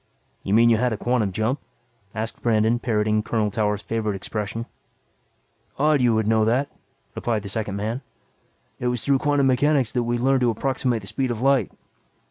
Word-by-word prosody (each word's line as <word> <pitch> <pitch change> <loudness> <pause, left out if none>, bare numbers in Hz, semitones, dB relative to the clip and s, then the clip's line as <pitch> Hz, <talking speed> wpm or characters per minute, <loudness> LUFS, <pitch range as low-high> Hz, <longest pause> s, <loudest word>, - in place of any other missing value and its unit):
"You 100 - 0
mean 115 +1 +6
you 115 - +4
had 125 0 +1
a - - -3
quantum 120 -3 0
jump?" 110 +8 -1 0.6
asked 110 +1 -4
Brandon 115 0 +2
parroting 110 -3 +1
Colonel 110 -1 -1
Towers' 105 -1 -1
favorite 110 -3 -2
expression. 105 +3 -4 1.1
"Odd 150 0 +3
you 120 -2 +3
would 110 -1 0
know 110 0 +3
that," 125 +6 +1 0.4
replied 110 -3 -2
the 100 - -6
second 105 -1 -3
man. 110 +6 -3 0.8
"It 125 - -1
was 125 -2 -2
through 140 -1 +3
quantum 145 -1 +2
mechanics 135 -1 +2
that 125 - 0
we 120 0 -1
learned 130 +2 +2
to 125 - +3
approximate 125 0 -1
the 100 - -11
speed 125 +6 -2
of 120 -1 -3
light. 135 -6 +3
115 Hz, 180 wpm, -23 LUFS, 110-125 Hz, 1.1 s, mean